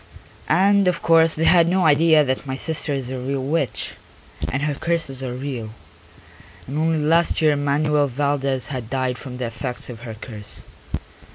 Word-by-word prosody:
And 195 +3 +4
of 180 -2 0
course 165 -1 +4
they 160 - -1
had 170 0 +5
no 185 0 +2
idea 155 +1 +5
that 130 0 -2
my 130 - -3
sister 155 +2 +2
is 135 -3 -3
a 130 - -4
real 135 +1 -3
witch, 145 -1 -1 0.6
and 135 +2 -2
her 150 -1 0
curses 145 -3 -1
are 125 -2 -4
real, 125 -5 -5 0.9
and 140 +4 -4
only 160 0 +1
last 165 +3 +3
year 155 -2 +3
Manuel 145 +1 +1
Valdez 140 0 -1
had 125 -5 -5
died 130 -2 -1
from 125 -3 -8
the 125 - -3
effects 125 +2 -5
of 115 - -10
her 115 -2 -8
curse. 105 -2 -8
140 Hz, 175 wpm, -22 LUFS, 130-160 Hz, 0.9 s, had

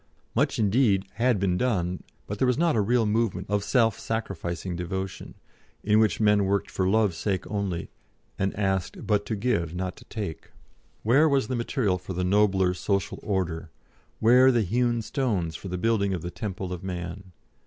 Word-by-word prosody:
Much - - +1
indeed 105 -2 +3
had 120 -2 +2
been 90 -2 +1
done, 90 -7 0 0.2
but 100 0 -5
there 130 - +3
was 125 - +2
not 170 -2 +2
a 110 - +3
real 115 +3 +2
movement 105 -4 0
of 105 -1 +1
self 115 -3 +2
sacrificing 90 -5 -3
devotion, 95 +2 -5 0.5
in 105 +1 +4
which 110 -1 +2
men 105 -2 +4
worked 100 +1 0
for 95 -1 0
Love's 105 -3 +2
sake 95 -1 -1
only, 100 -5 -3 0.5
and 95 0 +1
asked 95 -3 -1
but 105 -2 +1
to 110 - -1
give, 100 -7 -1
not 90 0 -3
to - - -14
take. 100 -8 -6 0.5
Where 140 +8 +5
was 135 -5 +1
the 130 - -1
material 115 -5 0
for 95 +1 -7
the 90 +1 -2
nobler 95 -1 +3
Social 100 0 -1
Order, 90 -5 -2 0.5
where 125 +4 +6
the 120 -3 +2
hewn 120 +3 +1
stones 105 - -1
for 95 - -7
the 90 0 -3
building 100 -1 +1
of 85 - -6
the 85 - -4
Temple 95 -2 -5
of 90 - -7
Man? 90 +1 -6
100 Hz, 180 wpm, -26 LUFS, 90-115 Hz, 0.5 s, where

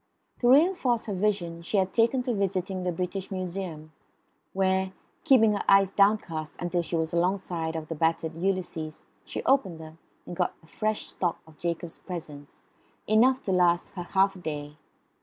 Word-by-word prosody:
To 240 - +3
reinforce 275 -5 +4
her 210 - -3
vision 185 -4 -1
she 175 +5 -2
had 190 -1 +1
taken 235 +3 +3
to 245 -1 -1
visiting 190 -2 -1
the 180 0 -1
British 180 +2 -4
Museum, 180 -4 -5 0.6
where, 190 0 +1 0.3
keeping 235 -8 +5
her 205 - -2
eyes 195 -1 +6
downcast 195 -7 +1
until 175 0 0
she 170 - -4
was 160 0 -1
alongside 170 -2 -1
of 160 -1 -4
the 165 - -3
battered 160 0 0
Ulysses, 170 -4 -3 0.2
she - - -5
opened 200 -12 +2
them 160 0 -11 0.3
and 175 - -7
got 180 0 0
a - - -17
fresh 215 +6 -3
shock 175 -3 -1
of 160 -1 -19
Jacob's 170 0 -4
presence, 150 -6 -9 0.4
enough 250 +5 +4
to 195 - -1
last 175 -2 +3
her 180 - -5
half 190 +2 +2
a - - -10
day. 150 -3 -5
185 Hz, 170 wpm, -27 LUFS, 165-200 Hz, 0.6 s, eyes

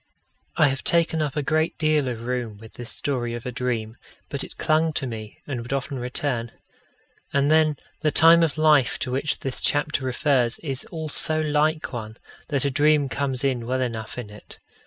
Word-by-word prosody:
I 145 - +5
have 135 0 -3
taken 165 -1 +2
up 150 -2 -2
a 150 - 0
great 155 +2 +1
deal 155 -3 +2
of 115 -2 -4
room 120 -4 -3
with 110 +1 -13
this 120 0 -8
story 120 -4 -2
of 120 - -7
a 125 - -3
dream, 120 -3 -2 0.3
but 140 -2 -3
it - - -10
clung 155 +1 +2
to 145 - 0
me, 110 -3 -7
and 130 -5 -4
would 120 - -8
often 135 0 -2
return. 125 -1 -2 0.8
And 140 +1 +3
then 155 -2 +4 0.2
the 155 - +3
time 165 +2 +7
of 160 -2 +1
life 150 -4 +4
to 125 - -3
which 140 +4 -1
this 135 -1 -3
chapter 145 -1 +1
refers 130 -1 +2
is 135 -4 -3
all 160 -2 -5
so 155 +2 0
like 155 0 +1
one, 110 -1 -6 0.3
that 140 -3 0
a 140 - +1
dream 145 0 +3
comes 135 -1 -2
in 125 -4 0
well 130 +1 0
enough 115 -3 -4
in 115 -4 -6
it. 105 - -12
135 Hz, 200 wpm, -24 LUFS, 120-155 Hz, 0.8 s, time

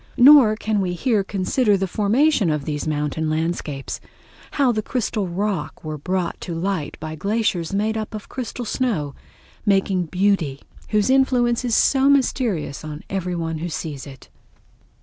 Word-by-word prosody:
Nor 255 -4 +8
can 215 -1 -1
we 180 -2 -1
here 215 +2 +1
consider 200 +3 +1
the 195 - 0
formation 215 - +2
of 150 -2 -1
these 150 0 -3
mountain 150 +1 -1
landscapes—how 160 - -3
the 215 -2 -1
crystal 215 -4 -2
rock 185 -2 -3
were 155 -1 -5
brought 180 +3 -2
to 170 - -5
light 170 -3 -2
by 155 0 -5
glaciers 195 -1 -1
made 210 +3 0
up 220 0 -4
of 210 - -7
crystal 250 -1 -5
snow, 205 - -1 0.5
making 195 -3 +1
beauty 180 -6 0 0.3
whose 210 +3 +2
influence 250 -3 +3
is 240 -3 +1
so 270 0 +4
mysterious 245 - +1
on 155 0 -7
every 180 -2 -2
one 165 -2 -3
who 175 +2 -3
sees 150 -3 -5
it. 135 -2 -12
195 Hz, 150 wpm, -22 LUFS, 160-225 Hz, 0.5 s, Nor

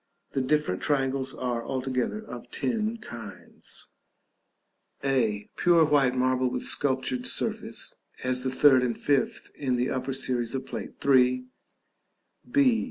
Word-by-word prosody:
The 135 - 0
different 130 -8 0
triangles 135 -2 0
are, 120 -2 -2
altogether, 130 - -2
of 120 - -9
ten 225 - -1
kinds: 115 - -8 1.1
a. 115 -7 +1
Pure 170 -2 +5
white 135 -4 +3
marble 130 0 +2
with 125 - -3
sculptured 130 -2 0
surface - - -1 0.3
(as 130 0 +1
the 130 - 0
third 130 0 +5
and 120 -2 -1
fifth 140 -2 0
in 130 -3 -1
the 125 +1 0
upper 130 +1 -2
series 125 -2 0
of 135 - -3
Plate - - -6
III.). 125 -2 +4 1.1
b. 260 -5 +4
130 Hz, 130 wpm, -27 LUFS, 125-140 Hz, 1.1 s, Pure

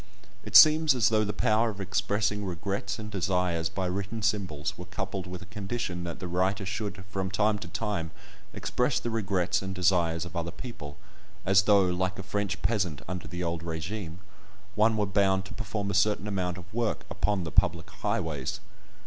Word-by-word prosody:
It - - -7
seems 155 -2 +9
as 115 -4 +4
though 110 -1 +3
the 105 - -1
power 110 +3 +2
of 100 -2 -7
expressing 100 +2 0
regrets 100 +2 -3
and 105 -1 -7
desires 90 -4 0
by 95 +2 -2
written 100 +4 -3
symbols 90 -9 -1
were 90 - -8
coupled 95 0 -4
with 90 0 -7
a - - -11
condition 100 -2 -4
that 85 - -5
the 90 - -4
writer 95 +3 0
should 100 0 -4
from 95 -1 -2
time 105 +2 +2
to 105 - -7
time 105 -7 -2 0.4
express 125 +1 0
the 120 - -3
regrets 100 -4 0
and 95 0 -4
desires 85 -2 +2
of 90 - -9
other 85 0 -2
people; 85 - -8 0.5
as 95 0 +6
though, 100 -2 +6
like 90 +1 -1
a 95 - -5
French 105 0 -2
peasant 95 -10 0
under 90 +1 -5
the 90 0 -4
old 85 -1 -2
régime, 85 +2 -4 0.6
one 110 +1 +3
were 105 - +2
bound 95 -1 +2
to - - -9
perform 105 -1 -3
a - - -2
certain 105 +1 +2
amount 90 -3 -1
of 90 +3 -12
work 115 -1 -1
upon 100 -3 0
the 80 - -5
public 85 -4 +2
highways. 95 - -2
95 Hz, 185 wpm, -28 LUFS, 90-105 Hz, 0.6 s, seems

